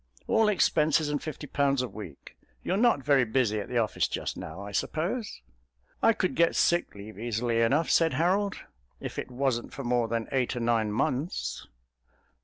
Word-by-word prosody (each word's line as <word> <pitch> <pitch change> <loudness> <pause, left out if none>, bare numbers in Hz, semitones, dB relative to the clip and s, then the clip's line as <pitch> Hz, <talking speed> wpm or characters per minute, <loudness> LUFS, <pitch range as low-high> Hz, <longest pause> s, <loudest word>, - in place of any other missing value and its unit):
All 220 -1 +3
expenses 155 -5 +2
and 145 -1 -1
fifty 155 -1 -6
pounds 140 -2 +1
a - - -2
week. 100 - -10 0.3
You're 185 - 0
not 220 - +3
very 140 -2 +4
busy 110 -2 +1
at 100 - -6
the 125 - -1
office 110 -2 +1
just - - -4
now, 80 +4 -8
I 100 +1 -7
suppose?" 170 - -2 0.6
"I 225 - +6
could 185 -4 -1
get 170 0 +3
sick 175 -8 +2
leave 100 0 -10
easily 115 0 0
enough," 140 +8 +2
said 165 -4 +3
Harold, 190 +7 +1 0.4
"if - - -5
it - - -5
wasn't 125 -2 -1
for 140 - -6
more 120 -1 +1
than 115 0 -2
eight 130 -2 0
or - - -2
nine 115 -2 +1
months." 130 +9 -2
130 Hz, 180 wpm, -28 LUFS, 115-160 Hz, 0.6 s, I